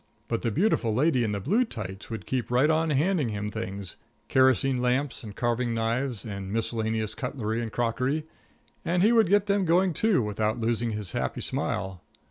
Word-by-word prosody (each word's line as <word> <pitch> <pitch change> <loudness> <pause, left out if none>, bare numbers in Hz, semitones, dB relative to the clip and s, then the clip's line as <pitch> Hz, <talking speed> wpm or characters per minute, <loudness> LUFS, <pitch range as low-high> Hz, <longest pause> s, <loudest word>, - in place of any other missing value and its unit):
But 115 - -1
the 120 - 0
beautiful 130 - +1
lady 130 -1 +3
in 110 - 0
the 100 - -2
blue 200 - +2
tights 105 - -7
would 110 -4 -6
keep 125 -4 -2
right 130 +6 +3
on 160 +1 +1
handing 150 -1 +1
him 105 0 -3
things 95 -2 -6 0.3
kerosene 130 0 +3
lamps 125 +2 0
and 105 -2 -8
carving 120 0 0
knives 115 +1 -1
and 100 -3 -5
miscellaneous 110 -1 -1
cutlery 120 -3 -3
and 115 -2 -4
crockery, 130 +7 -1 0.6
and 175 +2 +1
he 220 - +5
would 225 -6 +4
get 205 0 +4
them 200 -1 +2
going, 180 +1 +3
too, 205 - +2
without 105 +2 -1
losing 115 +1 0
his 105 -4 -3
happy 65 - -2
smile. 95 -2 -2
120 Hz, 180 wpm, -27 LUFS, 110-150 Hz, 0.6 s, he